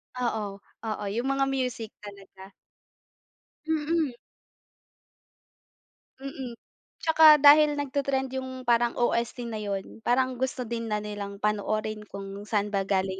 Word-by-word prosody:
Oo, 215 -5 -3 0.3
oo 215 -1 -3
yung 235 +5 -2
mga 275 0 +1
music 250 -4 -2
talaga. 195 -2 -12 1.2
Mm. 315 -3 0 2.0
Mm. 265 -3 -6 0.5
Tsaka 320 -2 +8
dahil 295 +1 +7
nag-te-trend 275 -2 -1
yung 260 0 -7
parang 240 -1 +2
OST 240 0 0
na 215 - -4
yun 200 0 -5
parang 255 +2 +1
gusto 260 0 -1
din 230 -1 -4
na 210 -1 -1
nilang 200 -1 -6
panoorin 215 0 -1
kung 200 0 -7 0.2
saan 210 -1 0
ba 195 -1 -1
galing 190 -1 0
235 Hz, 120 wpm, -27 LUFS, 210-265 Hz, 2.0 s, Tsaka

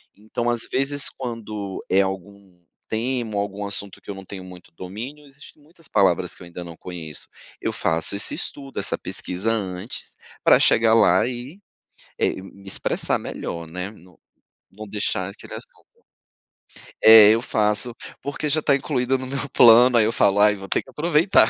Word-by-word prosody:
então 110 +3 -3
às 120 -1 -1
vezes 140 +1 +1
quando 110 -6 -6
é 95 - +4
algum 95 -1 -6 0.3
tema 115 -1 -2
ou - - +2
algum 100 0 -4
assunto 100 -1 -4
que - - -16
eu - - -7
não 95 - -9
tenho 95 0 -8
muito 90 -1 -13
domínio, 115 - -8
existem 145 +2 -15
muitas 165 +1 -17
palavras 90 -2 +2
que - - -18
eu - - -10
ainda 85 +1 -8
não 85 -1 -10
conheço, 80 -4 -8 0.3
eu - - -2
faço 80 +4 +1
esse 100 - +2
estudo, 135 -1 -5
essa - - -1
pesquisa 95 +5 -2
antes, 100 0 -5 0.3
pra - - +7
chegar 110 0 +4
lá 95 -2 +5
e, 125 +8 -7 0.6
eh, - - 0
me 100 0 -14
expressar 95 - -1
melhor, 85 -1 -6
né, 90 +4 -6
não 90 -4 -19 0.5
não 105 +2 -10
deixar 100 -2 -2
aquele - - -11
assunto. - - -11 1.2
É, 110 -2 +10
eu 115 +1 +2
faço, 110 +1 0 0.3
porque 140 +2 -4
já 155 +2 +2
está 145 -2 +3
incluída 135 -2 0
no 130 - -6
meu 140 +2 -4
plano, 120 +1 +7
aí 110 - +5
eu 110 - +1
falo: 100 -3 +2
"aí 105 0 +5
vou 95 -1 -9
ter - - +1
que - - -19
aproveitar". 165 +5 +3
105 Hz, 175 wpm, -23 LUFS, 95-125 Hz, 1.2 s, É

